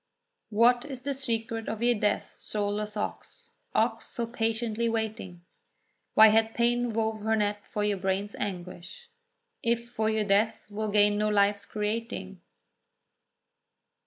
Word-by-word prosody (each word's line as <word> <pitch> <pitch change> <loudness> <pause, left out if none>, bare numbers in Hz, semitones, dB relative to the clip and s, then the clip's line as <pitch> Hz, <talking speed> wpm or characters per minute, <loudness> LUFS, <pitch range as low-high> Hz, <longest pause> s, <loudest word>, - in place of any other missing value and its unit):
What 235 +3 +4
is 270 -4 -8
the 280 +1 -1
secret 225 -4 -2
of 220 +1 -3
your 245 0 +5
death, 210 -2 -1
soulless 210 0 -2
ox, 470 - -6 0.2
Ox - - +1
so 235 - -3
patiently 230 0 -1
waiting? 220 -6 -3 0.7
Why 220 0 +9
hath 225 +1 +2
pain 240 0 +2
wove 220 0 -1
her 220 +1 +1
net 205 -1 0
for 210 - -1
your 205 -1 +1
brain's 195 +2 -1
anguish 185 - -6 0.5
If 235 -1 -1
for 220 -2 0
you 220 -1 +1
Death 205 +2 +1
will 215 +1 -2
gain 205 0 +4
no 215 0 +2
life's 205 0 +2
creating? 210 -3 -4
220 Hz, 135 wpm, -28 LUFS, 205-230 Hz, 0.7 s, Why